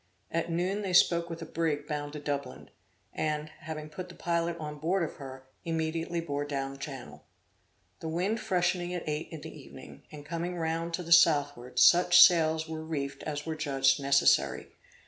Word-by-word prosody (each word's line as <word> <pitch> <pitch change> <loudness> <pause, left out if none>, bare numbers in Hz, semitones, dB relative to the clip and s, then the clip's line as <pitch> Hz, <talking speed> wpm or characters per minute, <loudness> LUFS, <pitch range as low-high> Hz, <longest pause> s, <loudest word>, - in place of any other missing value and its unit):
At 165 +1 -1
noon 180 +5 -1
they 190 -3 -3
spoke 170 -1 +4
with 165 0 -6
a - - -6
brig 155 -3 -2
bound 145 -1 -4
to 150 - -5
Dublin, 140 - -5 0.4
and, 150 0 -2
having 155 0 -7
put 180 +4 -8
the 175 - -11
pilot 170 0 -1
on 150 -2 -7
board 175 +5 0
of 160 - -5
her, 130 -2 -10 0.2
immediately 165 +1 -2
bore 145 -3 -3
down 135 -1 -4
channel. 125 - -8 0.8
The 160 - -5
wind 185 +7 -1
freshening 180 -3 0
at 175 - -6
eight 150 +1 -2
in 160 -3 -8
the - - -9
evening, - - -12
and 145 -1 -10
coming 170 +3 -4
round 165 +1 -2
to 180 - -6
the 170 - -9
southward, 145 -7 +4
such 175 0 +6
sails 160 -3 +6
were 160 0 -6
reefed 140 -3 -4
as 150 -1 -4
were 160 -1 -3
judged 135 -3 +2
necessary. 140 0 +3
160 Hz, 180 wpm, -29 LUFS, 145-170 Hz, 0.8 s, such